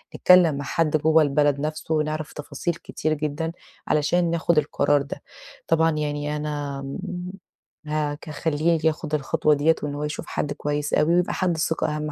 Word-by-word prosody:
نتكلّم 180 Hz, -4 st, +6 dB
مع 140 Hz, 0 st, -4 dB
حد 155 Hz, +3 st, +1 dB
جوّه 160 Hz, +1 st, +4 dB
البلد 145 Hz, 0 st, +2 dB
نَفسه 155 Hz, +2 st, -3 dB
ونعرف 155 Hz, 0 st, -2 dB
تفاصيل 150 Hz, +3 st, -3 dB
كتير 155 Hz, -1 st, -3 dB
جدًا 155 Hz, +2 st, -2 dB, 0.4 s
علشان 165 Hz, +3 st, +2 dB
ناخُد 170 Hz, 0 st, +1 dB
القرار 145 Hz, -1 st, +2 dB
ده. 140 Hz, -, -7 dB, 0.5 s
طبعًا 165 Hz, 0 st, +3 dB
يعني 150 Hz, -1 st, -2 dB
أنا 145 Hz, -2 st, -4 dB
م 180 Hz, +6 st, -5 dB, 0.6 s
هاك 150 Hz, 0 st, -2 dB
هاخلّيه 160 Hz, +2 st, 0 dB
ياخُد 155 Hz, -1 st, -1 dB
الخطوة 150 Hz, +1 st, +1 dB
ديّة 150 Hz, +3 st, +3 dB
وإن 145 Hz, -1 st, -3 dB
هو 145 Hz, -, -4 dB
يشوف 150 Hz, 0 st, -4 dB
حد 145 Hz, -, -2 dB
كويس 145 Hz, 0 st, -3 dB
أوي 165 Hz, +3 st, +3 dB
ويبقى 180 Hz, 0 st, +1 dB
حد 180 Hz, -3 st, 0 dB
ثقة 160 Hz, -1 st, 0 dB
أهَم 150 Hz, 0 st, -3 dB
150 Hz, 165 wpm, -24 LUFS, 145-160 Hz, 0.6 s, نتكلّم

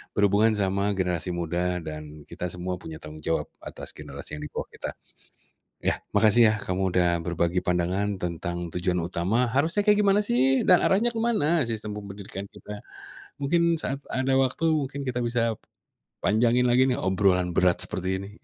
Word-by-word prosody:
berhubungan 105 Hz, +2 st, +3 dB
sama 100 Hz, +1 st, +1 dB
generasi 90 Hz, -1 st, -1 dB
muda 90 Hz, +1 st, -1 dB
dan 75 Hz, -1 st, -8 dB
kita 90 Hz, -, -5 dB
semua 90 Hz, 0 st, -3 dB
punya 80 Hz, -1 st, -8 dB
tanggung 75 Hz, 0 st, -10 dB
jawab 80 Hz, -, 0 dB, 0.2 s
atas -, -, -7 dB
generasi -, -, -5 dB
yang 75 Hz, -, -7 dB
di -, -, -7 dB
bawah -, -, -4 dB
kita. -, -, -6 dB, 0.9 s
Ya, -, -, +1 dB, 0.2 s
makasih, 110 Hz, +2 st, +6 dB
ya, -, -, 0 dB
kamu 95 Hz, 0 st, -1 dB
udah 90 Hz, -1 st, +4 dB, 0.2 s
berbagi 85 Hz, +1 st, 0 dB
pandangan 90 Hz, +3 st, 0 dB
tentang 85 Hz, 0 st, -4 dB
tujuan 90 Hz, 0 st, 0 dB
utama, 100 Hz, +8 st, 0 dB
harusnya 165 Hz, +9 st, +2 dB
kayak 210 Hz, 0 st, +5 dB
gimana, 200 Hz, 0 st, +4 dB
sih? 130 Hz, 0 st, +2 dB
Dan 180 Hz, -, +7 dB
arahnya 220 Hz, +5 st, +3 dB
ke 225 Hz, -, -2 dB
mana 175 Hz, -9 st, +2 dB
sistem 110 Hz, -2 st, -3 dB
pendidikan 100 Hz, -1 st, -7 dB
kita? 105 Hz, 0 st, -9 dB, 0.6 s
Mungkin 170 Hz, +3 st, +2 dB
saat 140 Hz, +1 st, -2 dB
ada 130 Hz, +1 st, +1 dB
waktu 135 Hz, +5 st, 0 dB
mungkin 140 Hz, -2 st, -1 dB
kita 125 Hz, -1 st, -2 dB
bisa 115 Hz, -2 st, 0 dB, 0.7 s
panjangin 120 Hz, +3 st, +3 dB
lagi, 130 Hz, +2 st, +4 dB
nih, -, -, +2 dB
obrolan 90 Hz, -1 st, +2 dB
berat 90 Hz, -1 st, +4 dB
seperti 95 Hz, +1 st, -3 dB
ini. 100 Hz, -, -9 dB
100 Hz, 165 wpm, -26 LUFS, 90-130 Hz, 0.9 s, Dan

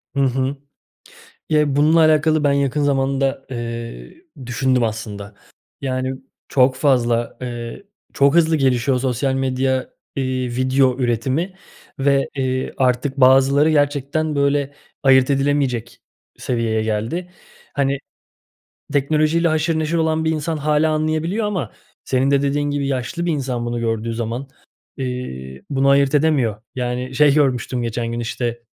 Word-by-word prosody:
Hı -, -, 0 dB
hı. 130 Hz, +1 st, 0 dB, 1.0 s
Ya, 155 Hz, -1 st, +4 dB
e 145 Hz, -2 st, 0 dB
bununla 155 Hz, +3 st, +4 dB
alakalı 155 Hz, -1 st, +3 dB
ben 145 Hz, -, +4 dB
yakın 140 Hz, +1 st, 0 dB
zamanda, 135 Hz, -1 st, 0 dB
eee, 115 Hz, -, -6 dB, 0.3 s
düşündüm 125 Hz, 0 st, +1 dB
aslında. 105 Hz, -2 st, -5 dB, 0.5 s
Yani, 130 Hz, -1 st, -2 dB, 0.4 s
çok 130 Hz, -1 st, +3 dB
fazla, 120 Hz, -4 st, +1 dB
ııı, 120 Hz, +7 st, -6 dB, 0.3 s
çok 140 Hz, +1 st, +3 dB
hızlı 165 Hz, -1 st, +4 dB
gelişiyor 130 Hz, -1 st, +2 dB
sosyal 130 Hz, +1 st, 0 dB
medya, 130 Hz, 0 st, 0 dB, 0.3 s
iii, 130 Hz, -1 st, -1 dB
video 130 Hz, 0 st, +2 dB
üretimi 130 Hz, -, -1 dB, 0.4 s
ve, 140 Hz, 0 st, +2 dB
ııı, 130 Hz, 0 st, -1 dB
artık 130 Hz, +1 st, +1 dB
bazıları 135 Hz, +3 st, +5 dB
gerçekten 145 Hz, +1 st, 0 dB
böyle 140 Hz, 0 st, +1 dB, 0.3 s
ayırt 130 Hz, -1 st, +5 dB
edilemeyecek 135 Hz, -4 st, 0 dB, 0.4 s
seviyeye 115 Hz, -3 st, -1 dB
geldi. 110 Hz, +12 st, -2 dB, 0.4 s
Hani, 140 Hz, 0 st, 0 dB, 1.0 s
teknolojiyle 155 Hz, +4 st, +2 dB
haşır 160 Hz, 0 st, +1 dB
neşir 160 Hz, +2 st, -1 dB
olan 160 Hz, 0 st, +1 dB
bir 160 Hz, -, +2 dB
insan 160 Hz, +1 st, -2 dB
hâlâ 150 Hz, +1 st, +2 dB
anlayabiliyor 155 Hz, +7 st, 0 dB
ama 180 Hz, -, -3 dB, 0.3 s
senin 135 Hz, +1 st, +1 dB
de 140 Hz, -, +3 dB
dediğin 145 Hz, +1 st, 0 dB
gibi 145 Hz, -1 st, -1 dB
yaşlı 135 Hz, +6 st, -2 dB
bir 170 Hz, -, +1 dB
insan 130 Hz, -5 st, -2 dB
bunu 120 Hz, 0 st, -2 dB
gördüğü 115 Hz, 0 st, -2 dB
zaman, 120 Hz, +3 st, -4 dB, 0.5 s
iii, 70 Hz, -, -5 dB
bunu 135 Hz, -1 st, +2 dB
ayırt 140 Hz, +1 st, +4 dB
edemiyor. 135 Hz, -9 st, +1 dB
Yani, 125 Hz, +1 st, -3 dB
şey 145 Hz, 0 st, +5 dB
görmüştüm 130 Hz, -4 st, +1 dB
geçen 115 Hz, 0 st, -3 dB
gün, 120 Hz, -, -3 dB
işte, 120 Hz, 0 st, -3 dB
135 Hz, 135 wpm, -20 LUFS, 125-145 Hz, 1.0 s, bazıları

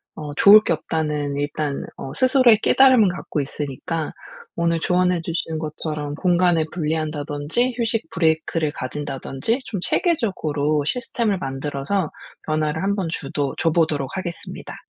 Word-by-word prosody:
어 150 Hz, -1 st, -6 dB
좋을 205 Hz, +7 st, +8 dB
게 170 Hz, -, +1 dB
없다.'는 150 Hz, -2 st, -2 dB
일단 145 Hz, 0 st, -2 dB
어 135 Hz, -, -7 dB
스스로의 255 Hz, -3 st, +5 dB
깨달음은 255 Hz, -6 st, +6 dB
갖고 175 Hz, -3 st, -3 dB
있으니까 150 Hz, +3 st, -4 dB, 0.4 s
오늘 170 Hz, 0 st, +1 dB
조언해 180 Hz, 0 st, +2 dB
주신 165 Hz, -1 st, -3 dB
것처럼 150 Hz, -1 st, -4 dB
공간을 175 Hz, -1 st, +2 dB
분리한다든지 155 Hz, -, -1 dB
휴식 230 Hz, -1 st, -1 dB
브레이크를 160 Hz, -1 st, +1 dB
가진다든지 140 Hz, -, -3 dB
좀 200 Hz, -, -4 dB
체계적으로 155 Hz, -, 0 dB
시스템을 230 Hz, -, -1 dB
만들어서 140 Hz, +5 st, -2 dB, 0.3 s
변화를 155 Hz, +1 st, -1 dB
한번 195 Hz, -2 st, 0 dB
주도 140 Hz, -2 st, -3 dB
줘보도록 155 Hz, -4 st, +1 dB
하겠습니다. 175 Hz, -2 st, -6 dB
160 Hz, 340 characters per minute, -22 LUFS, 145-185 Hz, 0.4 s, 좋을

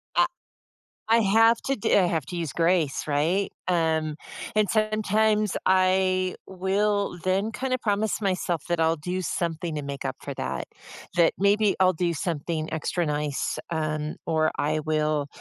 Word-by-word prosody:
I -, -, +5 dB, 0.8 s
I 225 Hz, +1 st, +4 dB
have 225 Hz, +3 st, +4 dB
to 275 Hz, 0 st, +1 dB
do -, -, -2 dB
I 190 Hz, -3 st, +5 dB
have 160 Hz, -5 st, -1 dB
to 175 Hz, -, -6 dB
use 165 Hz, -5 st, -3 dB
grace, 165 Hz, -4 st, +1 dB
right? 160 Hz, +7 st, +1 dB, 0.2 s
Um, 160 Hz, -3 st, +1 dB, 0.4 s
and 210 Hz, -2 st, +3 dB
sometimes 215 Hz, -1 st, +1 dB
I 185 Hz, 0 st, +3 dB
will 195 Hz, 0 st, 0 dB
then 195 Hz, +4 st, +1 dB
kinda 255 Hz, +3 st, -1 dB
promise 215 Hz, -1 st, -1 dB
myself 180 Hz, -5 st, -1 dB
that 175 Hz, -1 st, 0 dB
I'll 160 Hz, +1 st, +3 dB
do 180 Hz, +5 st, -3 dB
something 170 Hz, -1 st, -2 dB
to 150 Hz, -, -3 dB
make 140 Hz, 0 st, -6 dB
up 130 Hz, -, -3 dB
for 140 Hz, -, -5 dB
that, -, -, -4 dB, 0.5 s
that 170 Hz, -2 st, +4 dB
maybe 200 Hz, +1 st, +3 dB
I'll 185 Hz, 0 st, +5 dB
do 170 Hz, 0 st, -1 dB
something 160 Hz, 0 st, -3 dB
extra 160 Hz, +2 st, -1 dB
nice, 150 Hz, -2 st, -2 dB
um, 155 Hz, -1 st, -2 dB
or 160 Hz, -1 st, +2 dB
I 155 Hz, +1 st, 0 dB
will, 155 Hz, -1 st, 0 dB
180 Hz, 155 wpm, -26 LUFS, 155-200 Hz, 0.8 s, I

